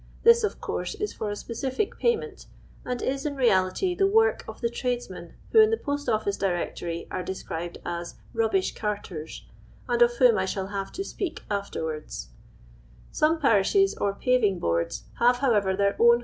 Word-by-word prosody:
This 465 0 +7
of 425 - -1
course - - -3
is 420 - -3
for 215 - -4
a 205 - -3
specific 260 - -3
j)ayment, 460 -3 -1 0.4
and 250 -1 -3
is 270 +1 -1
in 290 -2 -2
reality 240 - +2
tliewo:k 440 +4 +3
of - - -8
the 235 - +1
tradesmen 235 -8 -4 0.2
wh«» - - +4
in 435 0 +8
ihe 450 - +1
Tost 285 -1 -2
Ullice 215 -3 0
Directory 175 -2 -2
are 185 - -3
doscriU'd 175 -2 -5
as 170 0 -4
" - - -24
Kubbish 220 -4 +1
Carters," 195 -7 -5 0.4
and 240 -1 0
of 240 0 +6
whom 240 -4 +5
I 190 - +1
shall 190 0 -3
Inve 195 -1 -4
to 390 - -3
speak 375 -3 -5
afterwards, 160 - -4 0.8
t^ome 315 +2 +2
jiarishe* 275 - +4
or 200 -1 +1
paving 215 -3 +2
boards 85 - -1 0.2
have, 245 +1 +5
however, 210 -8 +2
their 200 0 +1
own 235 0 +6
230 Hz, 170 wpm, -26 LUFS, 190-285 Hz, 0.8 s, in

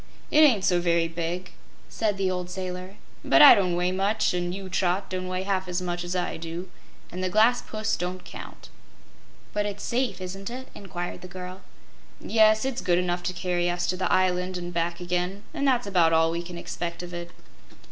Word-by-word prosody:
"It 300 - +5
ain't 255 -11 +6
so 175 -1 +3
very 170 -1 +2
big," 170 +2 -4 0.4
said 210 -3 -1
the 190 -1 +1
old 180 -1 -3
sailor, 185 +1 -5 0.3
"but - - +5
I 290 - +12
don't 185 -5 +2
weigh 180 +1 +1
much, 200 +3 +1
an' 175 0 -1
you, 190 +1 -6
Trot, 185 +1 0
don't 185 0 -3
weigh 185 0 -2
half 190 -1 -1
as 180 0 -1
much 175 -1 -3
as 175 +1 -3
I 180 - -1
do, 170 +3 -6 0.4
an' 180 - -5
the 185 - 0
glass 220 +5 +4
pussy 215 0 -2
don't 180 +1 -4
count." - - -10 0.8
"But 205 0 0
it's 205 0 -6
safe, 250 -1 -1
isn't 190 +2 -6
it?" 255 +2 -7
inquired 175 -3 -6
the 180 - -8
girl. 185 +1 -8 0.6
"Yes; 220 +1 +4
it's 265 -1 -2
good 175 -1 +2
enough 175 0 0
to 180 +1 -2
carry 175 -1 0
us 175 0 -1
to 185 - +1
the 185 - -1
island 180 0 +1
an' 175 0 -5
back 170 0 -1
again, 180 +3 -2
an' 285 -3 -1
that's 250 -4 +3
about 175 -5 +3
all 165 0 +4
we 170 +1 -2
can 175 0 -8
expect 170 0 -5
of 175 0 -8
it." 175 0 -6
180 Hz, 205 wpm, -26 LUFS, 175-195 Hz, 0.8 s, I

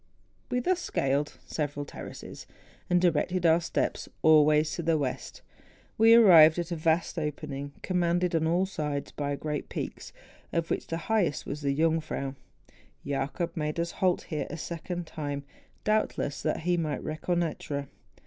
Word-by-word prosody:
We 250 -1 +1
thus 365 +7 +1
scaled 140 - -1
several 145 -1 -3
terraces, - - -9 0.4
and 180 - +4
directing 175 +1 +1
our 165 +1 +5
steps 170 - -2
always 155 0 +5
to - - -3
the 165 -1 +2
west, 135 -4 -4 0.5
we 225 +1 +7
arrived 170 -8 +8
at 175 0 -3
a - - 0
vast 165 +2 +1
opening, 145 -2 -4
commanded 175 -1 +1
on 160 -1 +2
all 175 +3 +2
sides 150 -6 -3
by 145 -1 -2
great 150 +1 -4
peaks, - - -5 0.4
of 165 0 -1
which - - -1
the 165 - -2
highest 205 -9 +1
was 150 - -5
the 140 -1 0
Jungfrau. 155 -3 0 0.7
Jacob 145 +5 -2
made 155 0 -2
us 170 0 -1
halt 185 -2 +1
here 155 -2 -3
a 165 - -5
second 170 +2 -5
time, 145 -3 -4 0.4
doubtless 215 -9 0
that - - -1
he 175 +2 +1
might 155 -4 -2
reconnoitre. 155 -3 -2
160 Hz, 150 wpm, -28 LUFS, 150-175 Hz, 0.7 s, arrived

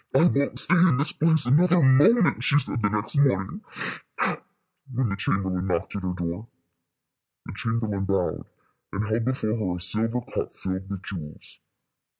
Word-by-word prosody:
"I 150 - +5
won't 140 -4 +1
stay - - +5
in 175 -6 +4
this 145 +3 0
place 160 -3 +2
another 170 +8 +4
moment," 155 - +4
she 145 - +3
said, 135 -3 +1
the 105 - +2
next 105 +7 -2
morning, 95 -10 +1 1.3
when 125 -2 -1
the 100 - -2
chamberlain 95 -2 -1
knocked 90 +1 -2
at 100 - -3
her 90 -1 -3
door. 90 +5 -4 1.0
The - - -8
chamberlain 110 -3 -2
bowed, 95 -2 -2 0.4
and 105 +2 -3
held 110 +1 -1
before 125 -4 0
her 95 -6 -2
a - - -6
silver 110 +7 0
cup 120 - -5
filled 95 +1 -4
with 100 -1 -6
jewels. 80 -7 -9
110 Hz, 160 wpm, -25 LUFS, 95-140 Hz, 1.3 s, I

